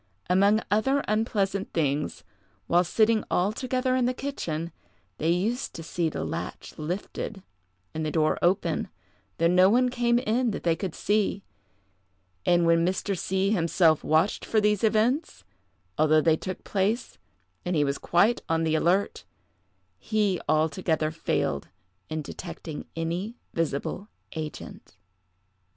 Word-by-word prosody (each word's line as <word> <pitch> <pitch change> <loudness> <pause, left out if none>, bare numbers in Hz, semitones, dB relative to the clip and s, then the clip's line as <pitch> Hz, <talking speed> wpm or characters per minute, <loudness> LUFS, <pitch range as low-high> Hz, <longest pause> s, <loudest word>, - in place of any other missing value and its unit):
Among 200 +4 +4
other 270 +7 +2
unpleasant 205 -3 0
things, 150 -2 -1 0.4
while 175 +1 +3
sitting 220 +4 +2
all 185 +3 +2
together 255 +2 -1
in 255 -1 +2
the 250 - -1
kitchen, 170 - -4 0.5
they 160 - +1
used 215 +10 0
to 165 - -6
see 165 0 -1
the - - -4
latch - - -5
lifted 185 +4 -4 0.5
and 160 - -3
the 155 - -1
door 155 -1 +1
open, 180 +3 +1 0.5
though 165 - +1
no 180 +2 +6
one 250 +3 +3
came 240 -1 +2
in 240 +1 +1
that 205 - -4
they 170 -1 +2
could 175 0 -5
see; 205 -1 0 1.0
and 175 -1 +4
when 165 0 +4
Mr. 190 +3 0
C—— 190 +2 0
himself 165 -4 +3
watched 160 +6 +2
for 220 - +1
these 210 -1 +2
events, 225 +8 +1 0.6
although 155 0 +5
they 160 0 +4
took 185 +3 -6
place, 205 +4 -1 0.4
and 180 0 -1
he 150 - +3
was 140 0 -1
quite 200 +8 +3
on 165 0 +1
the 160 -1 +1
alert, 175 +5 +1 0.8
he 205 - 0
altogether 155 0 +1
failed 70 - -1 0.4
in 155 -1 -3
detecting 165 -2 -7
any 170 +7 -3 0.2
visible 165 +5 -2 0.3
agent. 155 - -7
185 Hz, 135 wpm, -27 LUFS, 160-215 Hz, 1.0 s, no